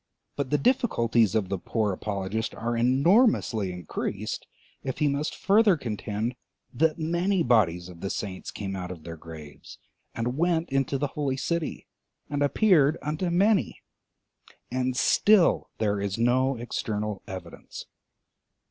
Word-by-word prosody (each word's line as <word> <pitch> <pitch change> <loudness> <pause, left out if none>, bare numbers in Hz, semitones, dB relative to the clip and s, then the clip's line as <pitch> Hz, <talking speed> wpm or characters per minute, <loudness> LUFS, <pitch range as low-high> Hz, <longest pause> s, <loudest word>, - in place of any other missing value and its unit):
But 140 -2 -2
the 150 - +2
difficulties 120 - +2
of 100 -4 0
the 95 -1 -2
poor 105 +1 -1
apologist 100 +3 -3
are 120 +1 -2
enormously 130 - +3
increased 90 -1 -4 0.4
if 130 -2 -3
he 150 - +2
must 145 +2 -1
further 200 -2 +4
contend 110 -1 -3 0.4
that 155 +4 +2
many 170 +3 +1
bodies 90 -8 +2
of 85 -2 -12
the 95 - -3
saints 95 -3 -5
came 95 -2 -5
out 90 -2 -5
of 90 -4 -8
their 85 0 -7
graves, 80 -3 -11 0.4
and 125 +4 -2
went 170 -2 +1
into 135 0 +1
the 140 +1 -1
holy 140 -3 -1
city, 170 +3 -2 0.5
and 145 0 -1
appeared 155 -1 +4
unto 155 +4 -2
many, 195 +3 +2 0.9
and 130 0 -1
still 205 +3 +4
there 105 -2 0
is 100 0 -2
no 130 +3 +2
external 105 -3 -3
evidence. 95 -1 -8
125 Hz, 140 wpm, -27 LUFS, 100-155 Hz, 0.9 s, further